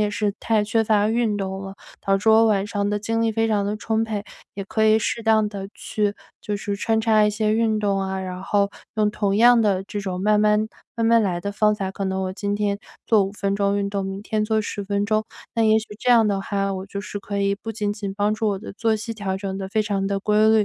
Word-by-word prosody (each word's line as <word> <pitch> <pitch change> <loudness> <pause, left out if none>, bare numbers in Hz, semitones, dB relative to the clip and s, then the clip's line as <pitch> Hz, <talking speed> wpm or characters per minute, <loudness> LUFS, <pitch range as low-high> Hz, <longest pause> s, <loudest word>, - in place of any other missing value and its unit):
也 210 - +2
是 205 -1 -1
太 220 -2 +1
缺 220 +2 +1
乏 210 -1 +3
运 225 -2 +1
动 190 -1 -3
了， 195 0 -7 0.3
导 195 0 +2
致 205 +3 -1
我 220 +1 +6
晚 200 -3 +2
上 205 -1 -2
的 205 0 -1
精 225 +2 -1
力 225 -1 +1
非 225 +1 +1
常 205 -2 +1
地 205 +1 -2
充 220 +1 0
沛。 215 -2 -3 0.3
也 195 - -4
可 220 +2 0
以 215 0 +5
适 230 - -1
当 220 -1 +3
地 195 -2 -6
去 205 -1 -2 0.3
就 210 - -3
是 200 0 -3
穿 220 +2 +1
插 220 -1 +4
一 210 - +3
些 215 0 0
运 220 0 +2
动 200 -2 +1
啊， 190 0 -2
然 185 -1 -5
后 200 +1 +1 0.2
用 215 -1 +2
同 200 -2 0
样 240 +2 +6
的 195 -3 +2
这 205 +1 -5
种 185 -2 -4
慢 210 0 +3
慢 210 +1 +3 0.3
慢 230 -1 -1
慢 230 0 +5
来 180 -4 -1
的 200 - -3
方法， 210 -2 +1
可 195 +1 -4
能 190 0 -1
我 185 0 -2
今 200 +1 -2
天 205 -1 -1 0.3
做 215 -4 +4
5 195 - -5
分 200 -1 -1
钟 200 0 +1
运 200 0 -1
动， 200 -1 -2
明 195 +1 -5
天 215 0 -1
做 220 0 +1
10 205 -1 -5
分 200 0 0
钟。 215 +1 +1 0.3
那 230 - +3
也 220 0 +5
许 220 - -6
这 250 - -3
样 230 -3 +6
的 200 -1 0
话， 195 0 -1
我 190 +1 -5
就 200 0 -5
是 205 0 -6
可 200 0 -4
以 200 0 +2
不 225 +2 -6
仅 205 -1 -1
仅 205 -2 -5
帮 205 +1 +1
助 215 0 0
我 200 - -1
的 210 - -9
作 225 +2 +1
息 220 +2 -4
调 195 -3 -3
整 195 0 -4
得 190 - -5
非 215 +2 +1
常 200 -2 -1
地 195 0 -1
规 215 +1 +3
律， 220 -1 +4
205 Hz, 280 characters per minute, -23 LUFS, 200-220 Hz, 0.3 s, 我